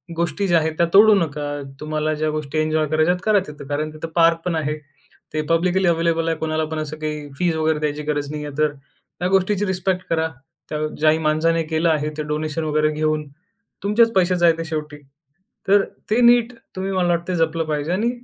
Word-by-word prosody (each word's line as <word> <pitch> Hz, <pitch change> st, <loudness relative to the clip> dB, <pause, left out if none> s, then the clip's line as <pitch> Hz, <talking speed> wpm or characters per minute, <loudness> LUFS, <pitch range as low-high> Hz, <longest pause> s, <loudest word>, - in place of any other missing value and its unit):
गोष्टी 170 Hz, +4 st, -1 dB
ज्या 170 Hz, -1 st, +4 dB
आहेत 160 Hz, 0 st, -1 dB
त्या 170 Hz, -, +4 dB
तोडू 215 Hz, +2 st, +8 dB
नका. 145 Hz, -5 st, -2 dB, 0.2 s
तुम्हाला 155 Hz, 0 st, -1 dB
ज्या 155 Hz, +1 st, -1 dB
गोष्टी 155 Hz, 0 st, -4 dB
एन्जॉय 155 Hz, 0 st, +1 dB
करायच्यात 155 Hz, +4 st, +2 dB
करा 215 Hz, -2 st, +4 dB
तिथं. 145 Hz, -2 st, -10 dB
कारण 150 Hz, +2 st, -2 dB
तिथं 155 Hz, +1 st, -6 dB
पार्कपण 165 Hz, 0 st, +3 dB
आहे. 150 Hz, -1 st, -1 dB, 0.6 s
ते 155 Hz, -, 0 dB
पब्लिकली 180 Hz, +2 st, +2 dB
अवेलेबल 165 Hz, -1 st, +1 dB
आहे. 165 Hz, -, -1 dB
कुणालापण 155 Hz, 0 st, -2 dB
असं 155 Hz, 0 st, -5 dB
काही 150 Hz, -1 st, -4 dB
फीस 175 Hz, -3 st, +1 dB
वगैरे 155 Hz, -1 st, +1 dB
द्यायची 150 Hz, 0 st, -2 dB
गरज 145 Hz, -1 st, -2 dB
नाही 150 Hz, 0 st, -5 dB
आहे 145 Hz, 0 st, -8 dB
तर 155 Hz, -1 st, +3 dB, 0.5 s
ह्या 180 Hz, -, 0 dB
गोष्टीची 195 Hz, +2 st, +2 dB
रिस्पेक्ट 190 Hz, -1 st, -1 dB
करा. 160 Hz, -1 st, +1 dB, 0.4 s
त्या 150 Hz, -, -3 dB, 0.2 s
ज्याही 155 Hz, 0 st, +4 dB
माणसाने 165 Hz, +2 st, +2 dB
केलं 160 Hz, +1 st, 0 dB
आहे 150 Hz, -1 st, +1 dB
ते 155 Hz, -, -2 dB
डोनेशन 155 Hz, +1 st, -2 dB
वगैरे 155 Hz, 0 st, +1 dB
घेऊन, 155 Hz, 0 st, -1 dB, 0.6 s
तुमचेच 225 Hz, +3 st, +3 dB
पैसे 185 Hz, -1 st, +3 dB
जायचे 165 Hz, -1 st, +3 dB
शेवटी. 150 Hz, -2 st, -5 dB, 0.7 s
तर 200 Hz, 0 st, +5 dB, 0.3 s
ते 240 Hz, +3 st, +3 dB
नीट 240 Hz, 0 st, +5 dB, 0.2 s
तुम्ही 190 Hz, +1 st, -3 dB
मला 185 Hz, -2 st, +1 dB
वाटत 170 Hz, +1 st, 0 dB
जपलं 165 Hz, 0 st, 0 dB
पाहिजे 150 Hz, +1 st, -2 dB
आणि 225 Hz, +5 st, +1 dB
160 Hz, 190 wpm, -21 LUFS, 155-180 Hz, 0.7 s, तोडू